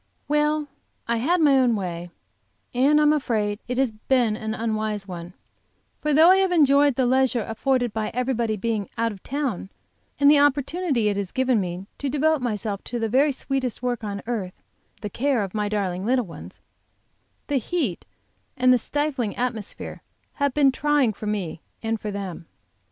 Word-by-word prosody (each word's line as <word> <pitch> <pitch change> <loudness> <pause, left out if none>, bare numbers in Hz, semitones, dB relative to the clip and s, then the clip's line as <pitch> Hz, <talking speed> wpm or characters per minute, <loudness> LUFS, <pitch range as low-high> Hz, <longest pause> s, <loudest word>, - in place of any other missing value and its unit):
WELL, 300 0 +1 0.4
I 235 0 +1
had 330 +9 +1
my 280 -3 +5
own 245 -3 +3
way, 175 -3 -4 0.6
and 275 +5 +4
I - - +4
am 300 0 +5
afraid 215 -8 -1
it 250 0 -3
has 265 -3 +2
been 225 0 +1
an 220 0 -4
unwise 215 -2 -2
one, 175 -1 -7 0.7
for 300 - 0
though 320 +5 +7
I 380 - +6
have 385 -1 +2
enjoyed 285 -4 +4
the 260 - +2
leisure 255 -2 +2
afforded 245 +1 0
by 215 -1 -2
everybody 240 -3 -1
being 210 -1 -2
out 230 0 +1
of 195 -3 -11
town, 260 -9 -3 0.5
and 285 - +5
the 295 - +6
opportunity 285 -2 +1
it 200 - -1
has 200 -3 -3
given 255 -4 +2
me 180 +1 -5
to 285 - -2
devote 300 +1 +2
myself 210 -4 -2
to 240 - -4
the 225 -1 -1
very 275 +6 +4
sweetest 260 -3 -3
work 245 -2 -1
on 200 -1 -4
earth, 210 -6 -3 0.5
the 210 - -4
care 260 -1 +1
of 195 - -6
my 210 -1 -1
darling 190 -3 -2
little 250 +2 +1
ones, 170 - -11 0.8
the 285 - 0
heat 260 - -2 0.5
and 255 0 +5
the 250 - +3
stifling 280 -5 -2
atmosphere 240 -4 -4 0.3
have 285 -2 -1
been 280 -2 +5
trying 285 -4 +2
for 210 - -7
me 190 -6 -3 0.2
and 225 -1 -1
for 210 - -4
them. 190 -4 -6
240 Hz, 180 wpm, -24 LUFS, 210-280 Hz, 0.8 s, though